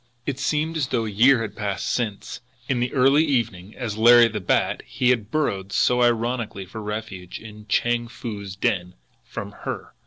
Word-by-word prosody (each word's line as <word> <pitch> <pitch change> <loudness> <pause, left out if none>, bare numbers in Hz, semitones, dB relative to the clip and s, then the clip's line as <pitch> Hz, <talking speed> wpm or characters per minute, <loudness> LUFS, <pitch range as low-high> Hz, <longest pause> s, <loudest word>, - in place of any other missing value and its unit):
It 140 -2 -3
seemed 155 +3 0
as 140 -5 0
though 115 -2 0
a 110 - -4
year 120 +4 +5
had 110 - -6
passed 100 -2 -3
since, 110 -3 -3 0.3
in 130 -2 0
the 125 +1 -1
early 135 +3 +4
evening, 115 - -1
as 110 -4 -4
Larry 120 +1 +8
the 105 -1 -4
Bat, 90 - +1
he 125 0 +2
had 110 -4 -1
burrowed 100 -10 -1
so 125 +4 +3
ironically 120 -4 0
for 110 +4 -8
refuge 105 -4 -6
in 105 -1 -12
Chang 120 +3 +1
Foo's 105 -5 -7
den 90 -2 -1 0.3
from - - -7
her! - - -6
115 Hz, 180 wpm, -23 LUFS, 105-125 Hz, 0.3 s, Larry